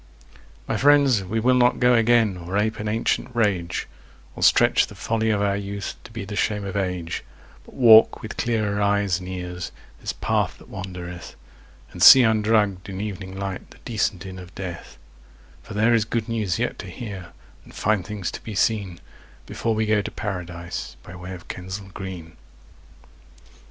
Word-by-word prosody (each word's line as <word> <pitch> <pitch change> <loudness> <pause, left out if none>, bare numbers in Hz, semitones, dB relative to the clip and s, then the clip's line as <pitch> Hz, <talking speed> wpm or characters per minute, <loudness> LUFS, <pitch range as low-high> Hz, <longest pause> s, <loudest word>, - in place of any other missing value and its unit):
My - - -1
friends, 140 -6 +4
we 105 +5 -2
will 125 +3 +3
not 125 -1 +3
go 125 0 +5
again 115 -3 +4
or 90 +2 -4
ape 110 +2 0
an 105 - -3
ancient 115 +3 -1
rage, 95 -6 0 0.5
Or - - -8
stretch - - +5
the - - -12
folly 110 -1 -1
of 105 -2 +1
our 100 -1 +1
youth 100 0 -4
to - - -11
be 110 -3 -6
the 105 +1 -6
shame 105 -1 0
of 95 - -5
age, 90 -4 -2 0.4
But - - -16
walk 115 -3 +7
with 110 - -6
clearer 110 -3 0
eyes 100 -3 +2
and 90 0 -8
ears 90 -1 -5 0.3
this - - -3
path - - -1
that - - -17
wandereth, 90 -2 -7 0.6
And - - -9
see 130 - +10
undrugged 105 -4 +2
in 95 -1 -5
evening 95 -2 -5
light 95 -1 -5
the - - -16
decent 100 -5 -1
inn 95 -1 -8
of 90 0 -12
death; 90 -7 -7 0.6
For 105 - -10
there 110 +3 +3
is 115 -2 +4
good 115 0 -2
news 110 -7 -1
yet - - -2
to - - -7
hear 100 -6 -7 0.4
and - - -16
fine 105 -1 +1
things 100 -1 -5
to - - -8
be 110 -3 -7
seen, 95 -4 0 0.5
Before 115 -1 -2
we 110 0 +1
go 105 -1 +2
to - - -5
Paradise 85 -9 -5
by 85 - -11
way 90 +1 -7
of 90 - -13
Kensal 95 +2 -7
Green. 90 -4 -8
100 Hz, 180 wpm, -23 LUFS, 90-110 Hz, 0.6 s, see